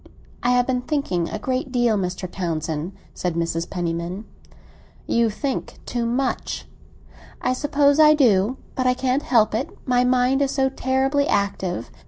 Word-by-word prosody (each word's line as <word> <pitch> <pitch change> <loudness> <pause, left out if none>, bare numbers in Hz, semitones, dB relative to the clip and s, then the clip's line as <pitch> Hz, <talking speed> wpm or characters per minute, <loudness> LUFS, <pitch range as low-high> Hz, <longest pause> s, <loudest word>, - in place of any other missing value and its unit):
I 245 - +1
have 250 0 +4
been 250 -1 0
thinking 245 - -1
a - - -3
great 255 +4 -2
deal, 240 -3 +2
Mr. 185 -1 -2
Townsend," 165 -1 -3 0.2
said 180 -2 -2
Mrs. 165 0 -1
Penniman. 175 +3 -3 0.8
"You 230 -1 +2
think 265 +5 -4
too 240 -1 -2
much." 255 +2 -2 0.7
"I - - 0
suppose 285 +1 +2
I 305 0 +7
do; 235 -3 +3 0.2
but 255 -1 0
I 250 - +3
can't 260 +2 0
help 220 -7 +3
it, 260 +9 -1 0.2
my 250 -1 +3
mind 250 +2 +2
is 280 - +2
so 265 0 +1
terribly 270 +2 +1
active. 195 - -1
245 Hz, 155 wpm, -23 LUFS, 185-265 Hz, 0.8 s, I